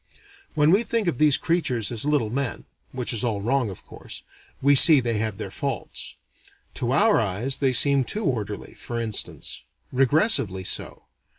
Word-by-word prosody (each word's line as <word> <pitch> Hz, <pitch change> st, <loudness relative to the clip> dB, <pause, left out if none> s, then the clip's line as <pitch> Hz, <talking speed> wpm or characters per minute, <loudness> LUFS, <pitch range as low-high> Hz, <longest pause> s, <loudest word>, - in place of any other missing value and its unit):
When 150 Hz, +1 st, +3 dB
we 195 Hz, +5 st, +4 dB
think 230 Hz, -3 st, -2 dB
of 160 Hz, -8 st, -2 dB
these 150 Hz, -2 st, +4 dB
creatures 145 Hz, -, -1 dB
as 115 Hz, +2 st, 0 dB
little 145 Hz, -8 st, 0 dB
men 135 Hz, 0 st, -4 dB, 0.3 s
(which 125 Hz, -2 st, -2 dB
is 115 Hz, -, -2 dB
all 110 Hz, -4 st, -1 dB
wrong 120 Hz, +2 st, -1 dB
of 95 Hz, -, -11 dB
course) -, -, -10 dB, 0.4 s
we 140 Hz, +1 st, +3 dB
see 150 Hz, +2 st, +9 dB
they 115 Hz, -3 st, -2 dB
have 110 Hz, -2 st, -3 dB
their -, -, -7 dB
faults. -, -, -6 dB, 0.7 s
To 120 Hz, -1 st, -1 dB
our 210 Hz, +11 st, +3 dB
eyes 115 Hz, +6 st, -2 dB
they 135 Hz, -2 st, +1 dB
seem 140 Hz, +2 st, +4 dB
too 210 Hz, -, -4 dB
orderly, 105 Hz, -7 st, -4 dB
for 120 Hz, -1 st, -6 dB
instance. 110 Hz, -3 st, -3 dB, 0.3 s
Repressively 130 Hz, -, +2 dB
so. -, -, -4 dB
130 Hz, 170 wpm, -23 LUFS, 110-150 Hz, 0.7 s, see